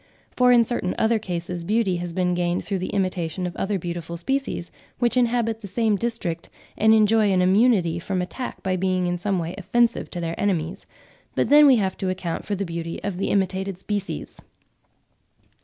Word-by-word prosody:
For 250 Hz, 0 st, +4 dB
in 240 Hz, -1 st, +6 dB
certain 215 Hz, -6 st, -2 dB
other 225 Hz, 0 st, +2 dB
cases, 175 Hz, -3 st, -4 dB
beauty 200 Hz, -1 st, +1 dB
has 175 Hz, 0 st, -4 dB
been 180 Hz, 0 st, 0 dB
gained 175 Hz, 0 st, -1 dB
through 195 Hz, -2 st, -2 dB
the 185 Hz, -, -3 dB
imitation 185 Hz, -2 st, -1 dB
of 175 Hz, -, -5 dB
other 200 Hz, 0 st, -1 dB
beautiful 170 Hz, -1 st, -5 dB
species, 265 Hz, -2 st, -2 dB, 0.3 s
which 240 Hz, 0 st, +1 dB
inhabit 235 Hz, -2 st, +1 dB
the 200 Hz, -, -7 dB
same 220 Hz, +1 st, +1 dB
district 200 Hz, -7 st, -3 dB, 0.3 s
and 220 Hz, +1 st, +4 dB
enjoy 215 Hz, -1 st, +4 dB
an 185 Hz, -, +3 dB
immunity 190 Hz, -4 st, +3 dB
from 185 Hz, +2 st, -2 dB
attack 215 Hz, +8 st, -5 dB
by 185 Hz, -1 st, 0 dB
being 185 Hz, 0 st, 0 dB
in 175 Hz, 0 st, -1 dB
some 195 Hz, +1 st, 0 dB
way 170 Hz, 0 st, -3 dB
offensive 235 Hz, +5 st, +1 dB
to 175 Hz, -, -5 dB
their 165 Hz, -1 st, -2 dB
enemies; 185 Hz, -2 st, -1 dB, 0.5 s
but -, -, +1 dB
then 295 Hz, 0 st, +8 dB
we 265 Hz, -, +7 dB
have 195 Hz, -5 st, 0 dB
to 190 Hz, -, -2 dB
account 185 Hz, -3 st, -3 dB
for 205 Hz, -, -1 dB
the 200 Hz, +1 st, -2 dB
beauty 170 Hz, -1 st, -5 dB
of 200 Hz, -3 st, -3 dB
the 195 Hz, -, -1 dB
imitated 190 Hz, -1 st, 0 dB
species. 200 Hz, +1 st, -4 dB
190 Hz, 190 wpm, -24 LUFS, 175-220 Hz, 0.5 s, then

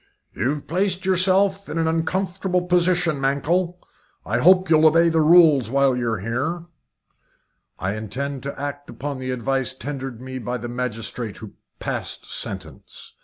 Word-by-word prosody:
"You've 140 Hz, +7 st, -2 dB
placed 185 Hz, +2 st, 0 dB
yourself 190 Hz, +1 st, +3 dB
in 160 Hz, -, -4 dB
an 165 Hz, -1 st, +1 dB
uncomfortable 180 Hz, +3 st, -1 dB
position, 175 Hz, -4 st, +2 dB
Mankell. 170 Hz, +6 st, 0 dB, 0.5 s
I 115 Hz, +3 st, 0 dB
hope 185 Hz, +6 st, +5 dB
you'll 160 Hz, -1 st, +5 dB
obey 165 Hz, +2 st, +4 dB
the 160 Hz, -1 st, +2 dB
rules 155 Hz, -7 st, +6 dB
while 135 Hz, 0 st, +2 dB
you're 115 Hz, -5 st, -2 dB
here." 140 Hz, -, -2 dB, 1.1 s
"I 95 Hz, +2 st, -2 dB
intend 130 Hz, +6 st, -4 dB
to 140 Hz, 0 st, -6 dB
act 145 Hz, 0 st, -5 dB
upon 140 Hz, -1 st, -5 dB
the 130 Hz, 0 st, -5 dB
advice 130 Hz, +1 st, -1 dB
tendered 135 Hz, -3 st, -6 dB
me 130 Hz, +1 st, -7 dB
by 125 Hz, 0 st, -3 dB
the 120 Hz, 0 st, -6 dB
magistrate 120 Hz, -2 st, -4 dB
who 110 Hz, -, -10 dB, 0.2 s
passed -, -, -4 dB
sentence." -, -, -5 dB
145 Hz, 145 wpm, -22 LUFS, 125-175 Hz, 1.1 s, rules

